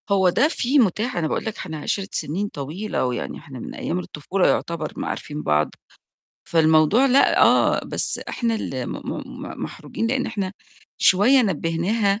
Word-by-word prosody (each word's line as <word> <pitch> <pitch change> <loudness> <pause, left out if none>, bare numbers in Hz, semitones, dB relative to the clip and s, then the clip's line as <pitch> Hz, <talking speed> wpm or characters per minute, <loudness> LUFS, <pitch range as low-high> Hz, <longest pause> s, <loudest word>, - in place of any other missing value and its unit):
هو 190 -2 +4
ده 275 +11 +3
فيه 280 -3 +1
متاح، 220 0 +1
أنا 165 -2 0
باقول - - -2
لك 220 - -4
إحنا 160 -4 -6
عِشرِة 195 +6 -2
سنين 190 +8 -2
طويلة 160 +4 -3
ويعني 125 -1 -3
إحنا 135 -5 -10
من - - -7
أيام 175 - -2
الطفولة 180 +2 -1
يُعتبر 165 -2 -1
ما - - -3
عارفين 150 0 -5
بعض. 75 0 +2 0.8
فالموضوع 160 - +4
لأ 270 +1 +4
آه، - - +4
بس - - -3
إحنا 230 -2 -1
اللي 130 - -3
م - - -5
م - - -5 0.3
م - - -7
محروجين 230 - -4
لإن 260 +2 0
إحنا 200 -4 -3 0.5
شوية 240 +8 +5
نبّهناها 195 +3 0
190 Hz, 165 wpm, -23 LUFS, 155-225 Hz, 0.8 s, شوية